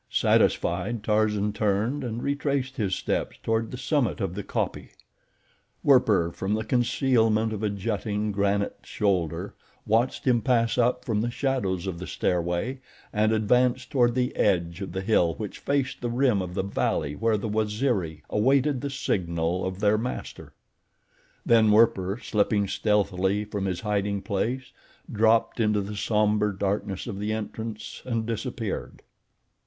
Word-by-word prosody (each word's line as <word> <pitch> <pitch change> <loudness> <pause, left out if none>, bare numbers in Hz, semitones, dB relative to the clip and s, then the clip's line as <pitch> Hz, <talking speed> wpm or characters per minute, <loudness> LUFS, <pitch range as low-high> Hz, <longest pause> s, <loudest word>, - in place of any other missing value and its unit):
Satisfied, 100 +6 +1
Tarzan 105 -1 +1
turned 110 +7 0
and 120 -1 -4
retraced 140 -2 -1
his 95 -4 0
steps - - -2
toward 110 0 0
the 125 - -6
summit 125 - 0
of 85 - -2
the 100 - -4
kopje. - - -3 0.9
Werper, 105 -11 +4
from 95 +5 -2
the 110 - -2
concealment 115 -2 +2
of 105 - -4
a 105 - +1
jutting, 105 +1 -2
granite 100 0 0
shoulder, 90 -6 -1 0.3
watched 115 +4 +1
him 120 -3 +3
pass 115 -1 +2
up 120 +1 +1
from 110 -3 0
the 120 - -1
shadows 120 -9 -1
of 90 -3 -4
the 90 - -6
stairway 90 +9 -1 0.3
and 110 0 +2
advance 125 +4 +2
toward 120 -2 +2
the 125 -1 0
edge 85 -2 +1
of 95 - -5
the 95 +1 -3
hill 90 -5 +2
which 105 -3 -6
faced 140 -2 -1
the 120 - -2
rim 120 -4 +2
of 90 -1 -6
the 95 - 0
valley 75 -6 -1
where 115 +2 +1
the 105 - -3
Waziri 105 - -1
awaited 135 +4 +2
the 140 - -3
signal 85 -9 -1
of 95 +1 -4
their 105 +1 +3
master. 125 +3 -6 0.9
Then 115 -2 +5
Werper, 105 -2 +3
slipping 105 -1 +1
stealthily 100 -1 +1
from 100 -2 -3
his 90 -2 -2
hiding 100 -2 -1
place, 120 +6 -2 0.4
dropped 115 +2 +2
into 105 -2 +2
the 100 +2 -6
somber 105 0 +1
darkness 100 0 -2
of 105 -5 -5
the 105 +1 -2
entrance 110 0 -5
and 115 -3 -2
disappeared. 115 -1 -4
105 Hz, 150 wpm, -26 LUFS, 100-120 Hz, 0.9 s, Then